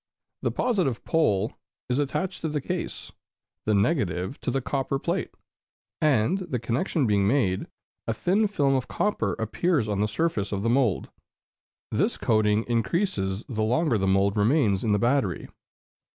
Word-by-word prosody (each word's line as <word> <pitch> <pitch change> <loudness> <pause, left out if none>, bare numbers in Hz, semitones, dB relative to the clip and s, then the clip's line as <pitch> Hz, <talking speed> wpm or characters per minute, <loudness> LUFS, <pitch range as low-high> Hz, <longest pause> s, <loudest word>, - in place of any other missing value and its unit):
The - - +1
positive 185 - 0
pole 110 - +1 0.3
is 125 +2 0
attached 145 +6 -2
to 160 - -1
the 150 0 -1
case, - - -4 0.6
the 105 - +3
negative 100 - 0
to - - -2
the 135 - 0
copper 135 +1 -1
plate; 170 +6 -2 0.7
and 150 - +3
the 175 -9 -3
connection 125 - 0
being 100 -3 +2
made, 100 -7 +1 0.4
a 115 - +1
thin 200 - +2
film 145 -9 +1
of 130 -2 0
copper 115 - 0
appears 115 - 0
on 105 -2 -1
the 105 - +2
surface 105 -4 -1
of 100 -1 -2
the 115 - +2
mould. 120 -6 +1 0.8
This - - +1
coating 110 -1 +2
increases 115 - -1
the 110 -4 -3
longer 120 +2 +2
the 95 - 0
mould 95 +1 +2
remains 105 -2 +2
in 110 - +1
the 105 - +4
battery. 120 - 0
120 Hz, 155 wpm, -26 LUFS, 105-150 Hz, 0.8 s, the